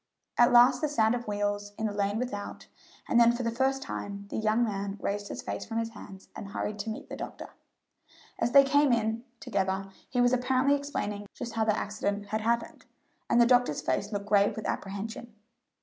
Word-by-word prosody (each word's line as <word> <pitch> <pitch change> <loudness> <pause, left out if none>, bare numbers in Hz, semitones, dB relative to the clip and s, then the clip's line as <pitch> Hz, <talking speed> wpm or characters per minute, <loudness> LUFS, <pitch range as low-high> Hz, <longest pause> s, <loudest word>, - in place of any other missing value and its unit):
At 240 +1 +5
last 245 +1 +6
the 305 - +2
sound 220 -6 +3
of 240 -1 -4
wheels 205 0 -2
in 220 - -2
the 210 - -1
lane 205 +1 0
without, 225 -4 -5 0.4
and 240 - +4
then 235 0 +7
for 240 +1 -3
the 230 - 0
first 270 +3 0
time 200 -4 -6
the - - -3
young 220 +2 +2
man 200 -2 -3
raised 205 0 -2
his - - -6
face - - -4
from 225 0 -5
his 230 0 -1
hands 195 -3 -12
and 200 - -7
hurried 205 +1 -4
to 215 +2 -3
meet 220 - -6
the - - -6
doctor. - - -7 0.9
As 230 - +1
they 275 +1 +8
came 285 0 +3
in 225 0 0 0.2
together 195 -3 -2 0.2
he 250 - -1
was 245 0 +4
apparently 255 +2 +2
explaining 210 -8 -4
just 240 -2 -6
how 225 -1 +1
the 215 -1 +2
accident 205 0 -2
had 215 0 -1
happened, 235 +1 -1 0.4
and 235 - +4
the 235 - +7
doctor's 245 - +3
face 200 - -1
looked 200 -1 -3
grave 205 -1 +3
with 220 - -6
apprehension. 215 +3 -5
220 Hz, 205 wpm, -29 LUFS, 205-245 Hz, 0.9 s, they